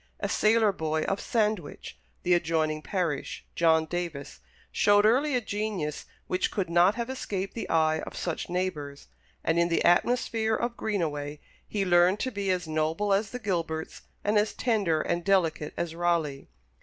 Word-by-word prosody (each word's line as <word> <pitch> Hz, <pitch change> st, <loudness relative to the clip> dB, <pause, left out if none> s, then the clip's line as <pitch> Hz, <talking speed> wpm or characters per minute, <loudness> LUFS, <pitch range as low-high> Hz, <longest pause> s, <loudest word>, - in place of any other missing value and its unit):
A -, -, -1 dB
sailor 215 Hz, 0 st, +3 dB
boy 160 Hz, -3 st, -1 dB
of 195 Hz, -, -1 dB
Sandwich, 210 Hz, -9 st, -2 dB, 0.3 s
the 180 Hz, -, +3 dB
adjoining 160 Hz, -2 st, +1 dB
parish, 165 Hz, -4 st, -3 dB
John 160 Hz, -1 st, +3 dB
Davis, 165 Hz, -4 st, -5 dB, 0.3 s
showed 205 Hz, 0 st, +4 dB
early 265 Hz, +6 st, +3 dB
a 250 Hz, -, +1 dB
genius 205 Hz, -8 st, -3 dB, 0.2 s
which 185 Hz, -, 0 dB
could 185 Hz, -4 st, -3 dB
not 175 Hz, +4 st, +5 dB
have 235 Hz, -1 st, -3 dB
escaped 200 Hz, -7 st, -4 dB
the 230 Hz, -, -5 dB
eye 160 Hz, -1 st, +2 dB
of -, -, -7 dB
such 170 Hz, -3 st, -3 dB
neighbours, 155 Hz, -6 st, -3 dB, 0.3 s
and 165 Hz, +1 st, +2 dB
in 170 Hz, -, +3 dB
the 170 Hz, -, +1 dB
atmosphere 220 Hz, +3 st, +2 dB
of 240 Hz, +2 st, -2 dB
Greenaway 150 Hz, -10 st, -2 dB, 0.3 s
he 200 Hz, -2 st, -1 dB
learned 180 Hz, +2 st, +4 dB
to 260 Hz, -, -1 dB
be 200 Hz, -3 st, -3 dB
as 180 Hz, -2 st, 0 dB
noble 160 Hz, +6 st, 0 dB
as 200 Hz, +1 st, +1 dB
the 250 Hz, -, -5 dB
Gilberts, 165 Hz, -7 st, -3 dB, 0.2 s
and 210 Hz, +1 st, +3 dB
as 210 Hz, +1 st, 0 dB
tender 200 Hz, -10 st, +1 dB
and 170 Hz, 0 st, -1 dB
delicate 170 Hz, -6 st, +1 dB
as 170 Hz, -2 st, -2 dB
Raleigh. 165 Hz, -5 st, -1 dB
180 Hz, 165 wpm, -28 LUFS, 160-210 Hz, 0.3 s, not